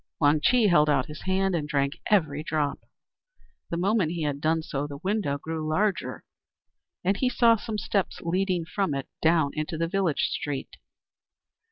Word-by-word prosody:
Wang 150 0 +4
Chih 245 +4 +4
held 150 -6 +5
out 130 -3 +2
his 150 0 -9
hand, 190 0 +1
and 150 -3 -2
drank 140 0 0
every 155 -8 +2
drop. 150 -3 -1 0.9
The 170 - -2
moment 185 -2 +1
he 170 -2 -3
had 145 -1 -2
done 160 +1 +1
so, 145 -2 -3
the 140 -1 -7
window 190 -8 0
grew 160 +1 -4
larger, 195 +5 0 0.8
and 195 +2 +1
he 255 - +1
saw 235 -2 +5
some 220 0 -4
steps 195 0 -1
leading 180 0 0
from 180 -3 -1
it 135 - -4
down 160 -3 +3
into 155 +1 -3
the 165 +1 0
village 180 -4 0
street. 145 -2 -4
165 Hz, 170 wpm, -26 LUFS, 150-195 Hz, 0.9 s, held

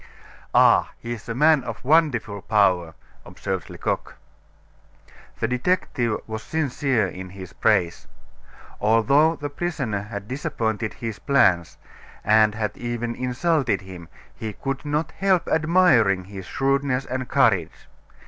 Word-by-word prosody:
"Ah, - - +5
he's 115 -2 -7
a 115 - -3
man 150 0 +4
of 115 0 -7
wonderful 125 -9 +2
power!" 90 -7 +2 0.3
observed 95 -5 -5
Lecoq. - - -3 1.2
The 115 - 0
detective 125 -3 0
was 110 0 -5
sincere 135 -7 0
in 95 0 -8
his 95 -1 -10
praise. 85 -1 +1 0.7
Although 140 +9 +3
the 145 -2 -6
prisoner 140 - -3
had 100 -1 -7
disappointed 115 -6 -2
his 115 -4 -6
plans, 90 - +2 0.5
and 110 0 +4
had 110 -1 -3
even 120 0 -3
insulted 125 - 0
him, 90 -3 -11 0.3
he 110 -1 -5
could 135 +6 -5
not 150 +2 -1
help 190 -3 +1
admiring 155 - +3
his 95 0 -9
shrewdness 135 -1 0
and 130 -1 -4
courage. - - +1
120 Hz, 120 wpm, -23 LUFS, 105-145 Hz, 1.2 s, Ah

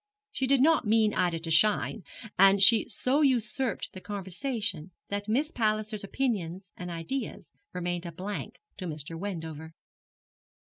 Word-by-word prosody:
She 265 -9 -1
did 275 -1 +4
not 315 -6 +4
mean 215 -1 +4
Ida 175 -2 +1
to 165 0 -5
shine, 210 +5 +3 0.3
and 195 +1 +6
she 220 +2 +6
so 255 +5 +1
usurped 255 -2 +1
the 185 - -8
conversation 200 - -3 0.2
that 205 +1 -3
Miss 285 +8 +1
Palliser's 215 -2 -1
opinions 195 -6 -2
and 180 0 -6
ideas 170 +11 -5 0.2
remained 175 -1 -3
a - - -5
blank 205 +6 -5 0.2
to 185 -3 -5
Mr. 155 0 -5
Wendover. 160 -4 -6
205 Hz, 140 wpm, -29 LUFS, 175-230 Hz, 0.3 s, and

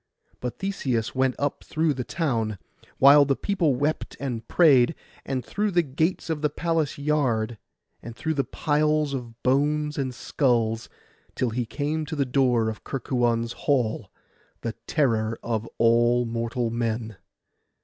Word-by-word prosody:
But 125 -1 -4
Theseus 130 - -2
went 130 -1 +1
up 145 0 -2
through 155 -1 0
the 130 -2 -4
town, 115 - -1 0.4
while 140 +2 +8
the 140 -1 +1
people 170 -8 +1
wept 145 +5 -2
and 120 -5 -4
prayed, 145 -4 +5 0.3
and 130 -2 -2
through 210 +1 -1
the 175 -3 +2
gates 155 +5 -1
of 160 -3 -2
the 150 - +2
palace 160 0 -1
yard, 125 -7 0 0.4
and 115 -1 -9
through 160 +5 -2
the 140 -2 +1
piles 150 +2 +1
of 120 -3 -7
bones 150 +3 +1
and 130 -2 -1
skulls, 115 -3 0 0.5
till 125 -3 0
he 120 0 -2
came 150 +3 -2
to 160 - -4
the 140 -2 +1
door 125 -3 +2
of 110 -1 -5
Kerkuon's 120 -3 -1
hall, 115 -7 0 0.5
the 115 - -3
terror 115 -7 +1
of 115 -1 -2
all 120 +1 +4
mortal 115 0 -2
men. 115 -2 -2
130 Hz, 150 wpm, -25 LUFS, 115-150 Hz, 0.5 s, while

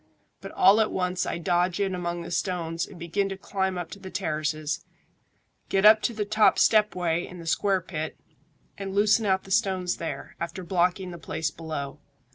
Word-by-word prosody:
But - - -8
all 200 +4 +6
at 215 - +1
once 180 -1 -1
I - - -2
dodge 175 +2 +1
in 195 -2 0
among 175 -1 -3
the 170 - -8
stones 170 -2 -2
and 190 - -12
begin 180 +4 -1
to 195 - -5
climb 190 -1 -2
up 170 -2 -5
to 200 - -8
the 190 -1 -8
terraces, 155 -4 -2 0.9
get 195 +1 +2
up 215 0 +8
to 240 - 0
the 210 -1 -1
top 215 +1 +4
step 210 -2 +4
way 175 -1 0
in 180 - -10
the 170 - -9
square 190 +3 +1
pit, 160 -3 -5 0.6
and 195 -1 -5
loosen 210 +2 +4
out 190 -1 +2
the 195 - -12
stones 190 -4 +1
there, 165 - -6
after 170 +2 -5
blocking 180 +1 0
the 170 - -8
place 160 0 -3
below. 155 -3 -6
180 Hz, 195 wpm, -26 LUFS, 170-195 Hz, 0.9 s, up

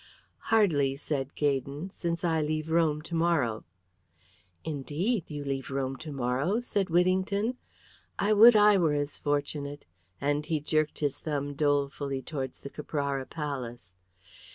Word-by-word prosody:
"Hardly," 155 -12 +3
said 140 -1 -3
Gaydon, 145 +4 -1
"since 170 -2 -3
I 165 -2 +2
leave 155 +1 -2
Rome 155 -2 +2
to 170 - -9
morrow." 165 -10 +1 1.0
"Indeed? 160 - -1
You 145 -2 -5
leave 135 -1 -3
Rome 135 -1 -2
to 155 +1 -8
morrow?" 135 - 0
said 200 -6 -1
Whittington. 190 +7 +1 0.6
"I 210 +1 +2
would 225 +3 +9
I 210 -1 +7
were 160 -4 +3
as 145 0 -2
fortunate," 145 0 -2 0.3
and 145 +1 0
he 160 -1 -1
jerked 155 +1 0
his 145 -2 -1
thumb 145 -2 -3
dolefully 140 -2 0
towards 135 -5 -5
the 140 - -7
Caprara 140 -3 -3
Palace. 125 - -5
150 Hz, 135 wpm, -29 LUFS, 140-170 Hz, 1.0 s, would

